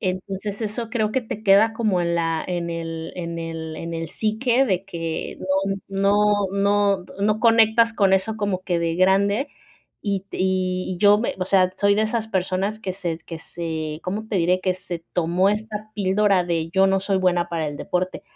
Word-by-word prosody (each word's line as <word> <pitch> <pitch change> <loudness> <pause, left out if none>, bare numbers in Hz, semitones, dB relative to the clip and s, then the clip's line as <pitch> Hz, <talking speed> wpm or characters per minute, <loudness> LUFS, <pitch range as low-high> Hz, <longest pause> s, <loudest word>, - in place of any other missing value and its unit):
Entonces 195 +2 -3
eso 220 +2 -3
creo 220 -3 0
que 260 - +1
te 220 -1 -6
queda 205 +2 +5
como 215 -6 +1
en 170 0 0
la 165 -1 0
en 175 -1 -2
el 165 -1 -5
en 170 -2 -5
el 165 -1 -5
en 165 +1 -6
el 165 0 -4
psique 235 - +1
de 190 -6 0
que 165 -3 -4
no 195 +1 0
no 205 +1 +2
no 200 -1 +2 0.2
no 215 +2 +1
conectas 230 0 +5
con 195 -3 +3
eso 215 +3 -1
como 200 -3 -2
que 175 -2 0
de 165 -1 -1
grande 200 +8 +3 0.5
y 200 -2 -1
te - - -7
y 185 0 0
y - - -12
yo 205 +1 +6
me 235 - -1
o 185 - -1
sea, 185 -1 +3
soy 200 0 +4
de 215 - +2
esas 220 0 -1
personas 190 +1 -1
que 185 -4 -3
se 175 -4 -4
que 165 - -8
se, 160 -2 -5
¿cómo 205 +4 -4
te 205 - -1
diré?, 180 +1 +2
que 185 -1 0
se 180 -2 -6 0.2
tomó 175 +3 +2
esta 215 0 -3
píldora 200 -1 +2
de: 165 -2 -1
"Yo 190 +1 +4
no 195 0 +2
soy 195 0 0
buena 180 -2 +1
para 165 -2 -2
el 145 - -6
deporte". 180 +1 -2
190 Hz, 200 wpm, -23 LUFS, 175-210 Hz, 0.5 s, yo